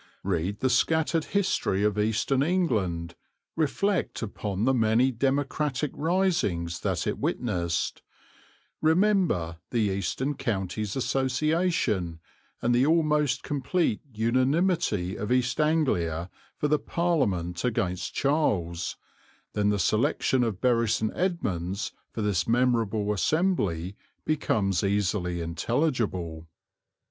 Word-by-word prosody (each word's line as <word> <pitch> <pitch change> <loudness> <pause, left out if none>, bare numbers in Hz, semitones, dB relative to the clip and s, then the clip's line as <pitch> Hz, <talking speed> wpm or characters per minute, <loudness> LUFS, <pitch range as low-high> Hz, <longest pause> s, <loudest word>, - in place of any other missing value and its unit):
Read 95 +2 -1
the 130 - +3
scattered 160 +5 +2
history 185 - 0
of 105 0 +1
Eastern 110 +5 +1
England, 105 - 0 0.4
reflect 165 - 0
upon 100 -1 -3
the 130 - +3
many 115 +2 +3
democratic 140 +2 0
risings 155 - 0
that - - -1
it - - -2
witnessed; 85 -8 -1 0.8
remember 160 - +2
the 120 - -2
Eastern 100 +9 -1
Counties 105 -4 -3
Association 135 - 0 0.4
and 120 - +3
the 120 +2 +4
almost 150 -3 +2
complete 145 - 0
unanimity 125 - +1
of 105 +2 -4
East 125 +2 +2
Anglia 95 - +1 0.3
for 150 - 0
the 150 0 +2
Parliament 100 - 0
against 95 -7 -1
Charles 95 - 0 0.6
then 105 -1 +1
the 105 - +2
selection 110 +6 +2
of 110 -6 -2
Bury 115 -3 +2
St. 110 0 +1
Edmunds 100 - -2 0.2
for 110 - -3
this 100 -5 0
memorable 115 -3 +1
assembly 100 - 0 0.3
becomes 105 - +1
easily 95 -3 0
intelligible. 90 - -1
115 Hz, 105 wpm, -27 LUFS, 95-150 Hz, 0.8 s, the